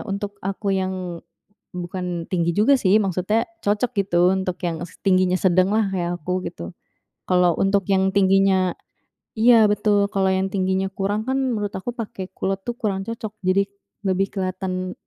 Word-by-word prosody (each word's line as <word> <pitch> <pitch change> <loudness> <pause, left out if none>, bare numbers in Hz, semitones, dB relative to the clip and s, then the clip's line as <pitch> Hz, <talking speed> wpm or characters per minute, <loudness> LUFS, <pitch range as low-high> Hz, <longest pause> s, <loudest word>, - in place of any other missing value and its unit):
untuk 200 0 -4
aku 195 +1 -1
yang 185 -2 -4 0.6
bukan 175 -1 -4
tinggi 170 -2 +1
juga 220 +7 +5
sih 195 0 +4
maksudnya 195 +3 0 0.2
cocok 210 +4 +1
gitu 175 0 +3
untuk 190 -2 -2
yang 165 -1 -2
s 175 - -11
tingginya 185 -1 +3
sedanglah 190 +4 +3
kayak 175 -1 -1
aku 180 +4 -2
gitu. 85 0 -7 0.6
Kalau 180 -2 +4
untuk 195 0 +2
yang 190 0 +3
tingginya 190 -1 +3 0.6
iya 230 0 +6
betul, 205 -1 +2
kalau 190 -1 +2
yang 190 0 0
tingginya 190 0 0
kurang 200 +2 -1
kan 265 - +1
menurut 220 -6 -1
aku 215 +6 -4
pakai 205 -5 -6
kulot 195 0 -2
tuh 240 - -2
kurang 195 -3 -1
cocok 225 -2 -5
jadi 185 +2 +3 0.4
lebih 190 +1 +1
keliatan, 185 -1 -3
190 Hz, 155 wpm, -22 LUFS, 185-205 Hz, 0.6 s, iya